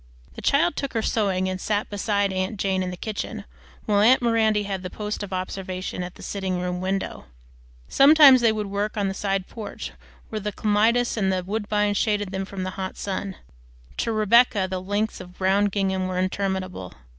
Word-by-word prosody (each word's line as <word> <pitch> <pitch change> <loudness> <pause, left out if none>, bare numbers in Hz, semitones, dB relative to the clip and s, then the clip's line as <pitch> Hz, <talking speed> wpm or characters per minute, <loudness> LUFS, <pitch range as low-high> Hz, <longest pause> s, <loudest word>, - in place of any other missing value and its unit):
The - - -9
child 305 +3 +2
took 275 - -4
her 225 - -1
sewing 190 -5 0
and 185 0 -3
sat 210 0 -1
beside 200 -1 0
aunt 185 +2 -2
Jane 190 -1 0
in 185 - -2
the 180 - -6
kitchen 215 +1 -5 0.4
while 205 -2 +2
aunt 245 +5 +6
Miranda 220 -3 +2
had 195 -2 -4
the 180 - -5
post 210 +3 -5
of 205 -2 -6
observation 185 0 -4
at 180 0 -6
the - - -12
sitting 190 -2 -2
room 180 0 -3
window. 190 +1 -3 0.6
Sometimes 275 -2 +7
they 230 -2 +4
would 215 -1 -2
work 205 +2 -3
on 200 -2 +1
the - - -3
side 195 -1 -1
porch 215 -3 -7 0.4
where 215 - -3
the 210 0 -3
clematis 225 +4 +2
and 190 -3 +1
woodbine 210 0 0
shaded 205 -1 0
them 190 0 -3
from 190 -1 -6
the 185 - -3
hot 185 - -5
sun. 195 -1 -4 0.6
To 230 - -1
Rebecca 215 -1 +4
the 185 -1 -4
lengths 205 +3 -2
of 180 0 -13
brown 195 +2 +2
gingham 190 -2 0
were 185 -1 -3
interminable. 185 - -2
200 Hz, 190 wpm, -24 LUFS, 185-215 Hz, 0.6 s, Sometimes